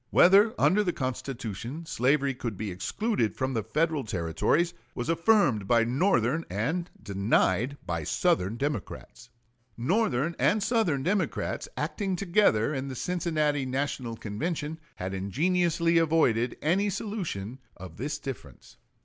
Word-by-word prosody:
Whether 205 +6 +6
under 210 +3 +4
the 175 -3 -1
Constitution 130 - -5
slavery 140 -1 +1
could 120 -5 -5
be 105 -1 -4
excluded 120 - -1
from 130 0 -1
the 115 - 0
Federal 150 +6 0
Territories 95 - 0 0.2
was 120 +6 -3
affirmed 165 - +3
by 115 +1 +4
Northern 135 - +1
and 150 - -2
denied 100 +5 +1
by 85 -2 -2
Southern 95 +7 +1
Democrats. 120 -3 -5 0.5
Northern 165 - +1
and 210 -1 +3
Southern 190 - +1
Democrats, 190 +4 -1
acting 195 -3 -2
together 175 - +2
in 135 -1 -3
the 130 - -5
Cincinnati 155 -3 0
National 130 -3 -2
Convention, 150 - -4 0.2
had 95 +1 -5
ingeniously 165 - +1
avoided 130 -8 +2
any 190 +7 +2
solution 170 - -4 0.2
of 90 -3 -10
this 145 +5 -3
difference. 135 -5 -9
140 Hz, 125 wpm, -28 LUFS, 115-170 Hz, 0.5 s, Whether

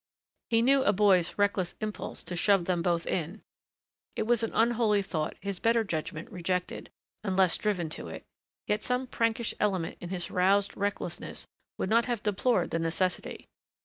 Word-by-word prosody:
He 230 0 +3
knew 270 +2 +5
a 205 - +4
boy's 190 -4 +3
reckless 200 -3 +1
impulse 215 -1 -5
to 180 - -4
shove 195 0 +3
them 175 -2 0
both 170 -1 0
in. 180 +5 -3 0.7
It - - 0
was 235 +1 +3
an 225 - 0
unholy 225 -3 +2
thought 155 -5 -3
his 200 -1 -4
better 230 0 +3
judgment 160 -4 -4
rejected 180 0 -3 0.3
unless 190 -3 +3
driven 195 -6 -1
to - - -4
it - - -8 0.4
yet 210 0 0
some 250 +3 0
prankish 230 -2 0
element 190 -5 -1
in 175 - -6
his 180 -2 -2
roused 195 +2 +2
recklessness 200 -4 -3 0.3
would 190 - -2
not 230 +2 +4
have 240 -4 -2
deplored 210 -1 +1
the 165 - 0
necessity. 170 +3 -2
200 Hz, 165 wpm, -29 LUFS, 180-220 Hz, 0.7 s, knew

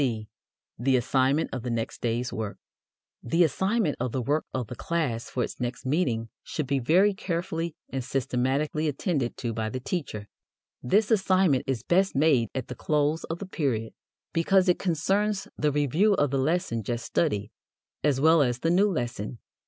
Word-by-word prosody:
(c) 115 -5 -1 0.5
The 130 +2 +3
Assignment 135 +4 +1
of 130 - -3
the 125 - -4
Next 115 -1 -3
Day's 120 +1 -1
Work. 110 -2 -4 0.6
The 165 +9 +3
assignment 190 - +1
of 125 0 -1
the 130 - -1
work 150 +5 0
of 125 -2 -2
the 125 - -8
class 140 -9 -2
for 125 - -1
its - - -6
next 125 +2 -4
meeting 125 -6 0
should 155 - -3
be 135 +1 0
very 180 +11 +4
carefully 170 -3 -3
and 130 -1 -4
systematically 135 +5 0
attended 140 - -1
to 120 -2 -3
by 110 0 -2
the 130 - -4
teacher. 125 - -4 0.5
This 205 - +2
assignment 185 - +3
is 135 -4 -1
best 190 0 +2
made 135 -6 +3
at 130 -2 -3
the - - -5
close 150 +4 0
of 165 - -4
the 200 - -6
period 130 - -2 0.4
because 185 +3 +3
it 180 - +3
concerns 195 +4 0
the 150 -1 +1
review 150 - +3
of 145 -5 +1
the 135 - +1
lesson 135 -5 0
just 120 +3 -3
studied, 105 -11 0 0.5
as 145 -3 +2
well 160 +2 +5
as 125 -2 0
the 165 - +2
new 195 +4 +4
lesson. 120 - -3
140 Hz, 175 wpm, -27 LUFS, 125-170 Hz, 0.6 s, well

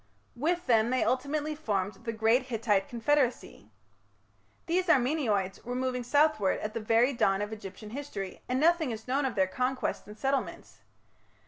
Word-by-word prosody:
With 340 +7 -1
them 230 -2 +3
they 255 0 +1
ultimately 285 +5 -1
formed 205 -7 -3
the 230 - -1
great 225 +3 +2
Hittite 215 -5 0
confederacy. 250 +2 0 1.0
These 360 +2 0
Armenoids 245 - +1
were 245 +1 -4
moving 255 0 -1
southwards 285 -6 +2
at 215 0 -3
the - - -2
very 230 +5 +3
dawn 195 -5 +2
of 205 +1 -3
Egyptian 210 0 -9
history, 220 -8 -6
and 255 +1 +1
nothing 325 -1 +3
is 220 0 -6
known 270 +3 +1
of 255 -3 -2
their 190 -2 +3
conquests 255 +6 -2
and 210 +1 -11
settlements. 270 +3 -3
245 Hz, 155 wpm, -29 LUFS, 215-280 Hz, 1.0 s, them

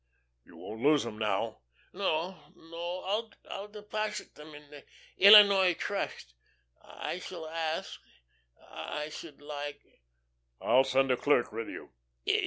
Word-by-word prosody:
"You - - -17
won't 110 +1 -8
lose 145 -1 +4
'em, 110 -2 -7
now?" 110 +1 -1 0.3
"No, 175 -2 -2
no. 180 +6 -4 0.2
I'll 195 +1 -6
deposit 210 0 -5
them 150 +1 -13
at 145 - -11
once - - -20
in 145 - -24
the 145 -1 -12 0.3
Illinois 200 -3 +8
Trust. 60 - -4 0.5
I 180 - -6
shall 175 -3 -8
ask 160 0 -3 0.7
I 150 0 -5
should 150 -2 -10
like." 145 0 -6
165 Hz, 105 wpm, -30 LUFS, 145-195 Hz, 0.7 s, Illinois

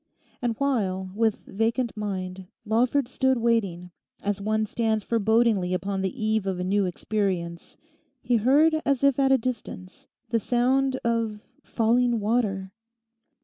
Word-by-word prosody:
And 240 -2 -1
while, 190 -9 -1
with 220 0 0
vacant 230 +4 -1
mind, 190 -3 -5 0.2
Lawford 240 +5 +2
stood 265 0 +1
waiting, 200 -7 0 0.3
as 205 0 -1
one 215 +1 0
stands 220 -1 -1
forebodingly 220 -4 +2
upon 195 +1 -2
the 215 +5 -3
eve 215 -2 0
of 185 -2 -2
a - - -1
new 195 +2 +1
experience 180 -3 -3 0.5
he 245 - +2
heard 300 +8 +4
as 275 -1 0
if 280 -1 +3
at 270 -1 +3
a 270 - +6
distance 220 -6 -6 0.2
the 230 - +1
sound 260 +4 +1
of 230 -2 -1 0.2
falling 235 +1 +1
water. 205 -3 -1
220 Hz, 140 wpm, -25 LUFS, 195-245 Hz, 0.5 s, a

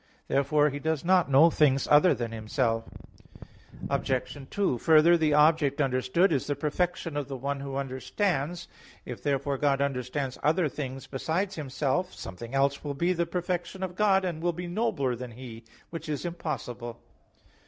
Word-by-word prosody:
Therefore 145 +2 +2
He 145 - -5
does 160 +1 -2
not 180 -3 +4
know 145 +5 +6
things 140 -4 +3
other 150 +5 +6
than 120 -2 -4
Himself. 115 +1 -1 1.0
Obj. 130 +1 -1
2: 195 -11 0
Further, 160 +3 +6
the 155 -3 +2
object 150 -2 +4
understood 135 +7 +2
is 135 - -1
the 145 - 0
perfection 160 +2 -2
of 145 -2 -2
the 135 -2 -5
one 140 +2 -3
who 135 -1 -6
understands. 145 +5 -2 0.4
If - - -7
therefore 140 -1 -1
God 140 -2 +2
understands 135 0 -2
other 160 +2 +2
things 135 -2 -6
besides 165 +8 -2
Himself, 150 +3 -2
something 115 +7 -8
else 140 +1 +1
will 145 -2 -4
be 175 +6 +1
the 170 -1 -1
perfection 180 +2 -3
of 180 -1 -4
God, 195 -2 +3
and 170 -3 -3
will 175 0 0
be 175 +2 -6
nobler 175 - -1
than 120 0 -8
He; 115 -2 -10 0.3
which 165 -2 -6
is 150 +3 -3
impossible. 125 -8 -5
145 Hz, 165 wpm, -28 LUFS, 135-170 Hz, 1.0 s, know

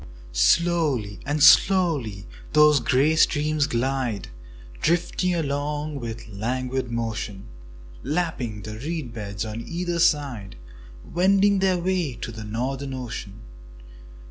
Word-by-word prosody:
Slowly 125 - +2
and 145 0 +1
slowly 160 - +4 0.3
those 150 -1 +6
grey 135 +6 +2
streams 150 -2 +2
glide, 120 -3 -2 0.5
Drifting 175 +2 +1
along 145 -1 -2
with 115 -1 -6
a - - -13
languid 125 +4 -2
motion, 110 -4 -4 0.6
Lapping 135 - -2
the 110 +1 -7
reed 150 -3 -4
beds 105 -1 -5
on 110 +1 -5
either 175 +5 -3
side, 140 - +1 0.5
Wending 195 +3 +3
their 190 -1 +2
way 175 -6 -1
to 115 - -6
the 110 -1 -8
Northern 130 +5 -3
Ocean. 115 -5 -7
135 Hz, 115 wpm, -24 LUFS, 115-160 Hz, 0.6 s, those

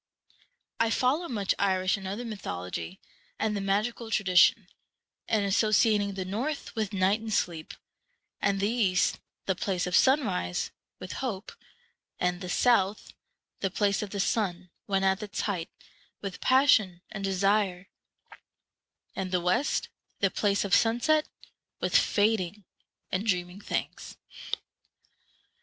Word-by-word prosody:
I 230 - +3
follow 265 +9 +1
much 205 -5 0
Irish 185 -2 +2
and 195 -1 -7
other 205 +6 -4
mythology, 90 - -5 0.4
and 215 -1 0
the 200 - -2
magical 215 +4 -1
tradition, 185 -5 +4 0.6
in 220 -2 +2
associating 205 0 +3
the 190 -1 -3
North 250 +11 -3
with 220 -3 -2
night 195 +1 +2
and 225 -1 -5
sleep, 170 -6 -1 0.7
and 200 0 +1
the 200 - +2
East, 210 -6 +2 0.3
the 190 - +1
place 185 -1 -1
of 180 - 0
sunrise, 210 - +2 0.3
with 185 - -8
hope, 220 -6 -4 0.7
and 180 0 0
the 180 - -5
South, 210 -2 +2 0.5
the 195 - 0
place 200 +1 +1
of 210 - -4
the 200 - -5
sun 185 -4 -1 0.2
when 195 -1 +1
at 190 +2 +2
its 210 -1 -4
height, 180 -6 -2 0.5
with 190 -3 -6
passion 220 -9 +4
and 195 - -6
desire, 195 -1 +1 1.3
and 190 -1 -3
the 180 - +2
West, 180 - +1 0.3
the 195 -2 +2
place 200 -1 +1
of 200 - -2
sunset, 240 +7 +3 0.5
with - - -1
fading 205 -2 +2 0.5
and 195 +4 -1
dreaming 180 0 -1
things. - - -4
200 Hz, 130 wpm, -28 LUFS, 185-220 Hz, 1.3 s, tradition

